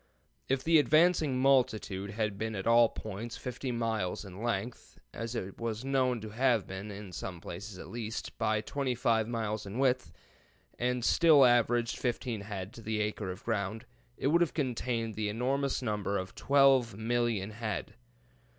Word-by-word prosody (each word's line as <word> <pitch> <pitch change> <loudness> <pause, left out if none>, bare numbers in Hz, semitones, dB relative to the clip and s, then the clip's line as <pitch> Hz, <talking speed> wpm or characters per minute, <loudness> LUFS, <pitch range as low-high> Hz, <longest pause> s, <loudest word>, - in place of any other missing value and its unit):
] - - -40
If 135 0 +1
the 165 -1 +5
advancing 155 -2 +4
multitude 110 -7 +2
had 105 0 -2
been 110 0 -2
at 95 - -4
all 115 0 +6
points 110 +3 -6
50 125 +1 -4
miles 110 -5 -2
in 95 +1 -9
length 120 +1 -3 0.2
(as 115 +1 -5
it 95 -4 -5
was 115 +1 -3
known 130 -3 +1
to 110 - -6
have 120 -2 +2
been 95 +2 -6
in 100 -1 -8
some 90 0 -6
places 95 +4 -8
at - - -9
least) 115 -1 -5
by 110 -1 +1
25 120 -4 0
miles 110 -3 -3
in 100 +4 -6
width, 130 -1 +1 0.7
and 125 0 0
still 155 -5 +6
averaged 120 -1 +3
fifteen 120 -2 -2
head 100 -1 -6
to 115 - -10
the 110 0 -2
acre 105 -2 -2
of 90 +1 -7
ground, 110 +1 -2 0.3
it - - -5
would 170 +3 +4
have 170 - +1
contained 120 -5 -1
the 105 0 -2
enormous 130 +5 -1
number 105 -3 -1
of 95 0 -5
12,000,000 120 -6 +2
head. 110 0 -4
115 Hz, 165 wpm, -31 LUFS, 105-125 Hz, 0.7 s, all